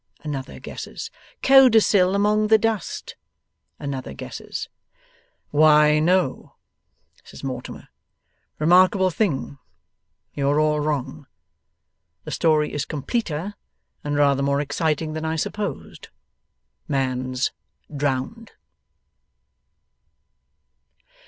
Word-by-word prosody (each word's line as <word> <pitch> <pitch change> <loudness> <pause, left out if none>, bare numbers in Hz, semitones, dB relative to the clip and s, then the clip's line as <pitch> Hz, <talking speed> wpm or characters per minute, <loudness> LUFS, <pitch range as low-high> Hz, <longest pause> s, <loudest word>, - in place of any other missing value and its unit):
another 140 -3 -6
guesses. - - -8 0.3
'Codicil 220 -8 +5
among 210 +1 +2
the 220 +1 +6
dust?' 220 -3 -3 0.6
another 135 -2 -5
guesses. - - -7 0.8
'Why, 150 0 +5
no,' 175 -2 0 0.7
says - - -13
Mortimer; 130 -2 -6 0.7
'remarkable 185 +4 +4
thing, 140 - -2 0.7
you 140 -1 0
are 145 +1 +2
all 155 0 +2
wrong. 145 -2 -3 1.0
The - - -7
story 155 -2 +1
is 145 - -1
completer 170 - -3 0.5
and 145 0 -2
rather 140 -1 +3
more 140 0 +1
exciting 155 +1 -1
than 155 0 -4
I 160 0 -1
supposed. 205 +6 -5 0.8
Man's 130 -1 -1 0.4
drowned! 145 - -3
150 Hz, 85 wpm, -23 LUFS, 140-185 Hz, 1.0 s, the